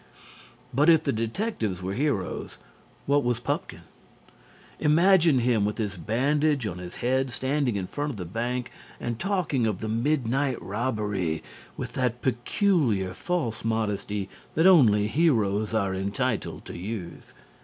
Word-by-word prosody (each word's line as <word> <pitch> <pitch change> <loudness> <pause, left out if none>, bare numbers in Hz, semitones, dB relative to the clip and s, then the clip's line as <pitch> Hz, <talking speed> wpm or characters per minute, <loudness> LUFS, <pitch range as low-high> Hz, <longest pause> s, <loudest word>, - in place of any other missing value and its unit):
But 145 +6 +4
if 160 -2 +6
the - - 0
detectives 115 - -2
were 95 +1 -2
heroes, 125 -7 -2 0.5
what 145 +1 +3
was 120 -1 0
Pupkin? - - -3 1.0
Imagine 165 0 +5
him 120 -3 +2
with 105 +1 -1
his 105 -3 -2
bandage 140 - +1
on 90 -4 -4
his 90 -1 -8
head 130 +1 +2
standing 130 -1 0
in 95 -2 -2
front 145 +9 -3
of 130 - -5
the 90 - -5
bank 120 +6 -3 0.3
and 120 -1 -3
talking 175 - 0
of 105 -4 -1
the 110 - -4
midnight 130 +2 0
robbery 105 -5 -2 0.3
with - - -5
that 125 -2 -1
peculiar 120 - +1
false 125 - -2
modesty 105 -3 -1 0.3
that 160 - +3
only 120 - +6
heroes 110 -8 +2
are 100 -3 +1
entitled 100 +5 -2
to - - -8
use. 90 -1 -7
120 Hz, 140 wpm, -26 LUFS, 105-145 Hz, 1.0 s, if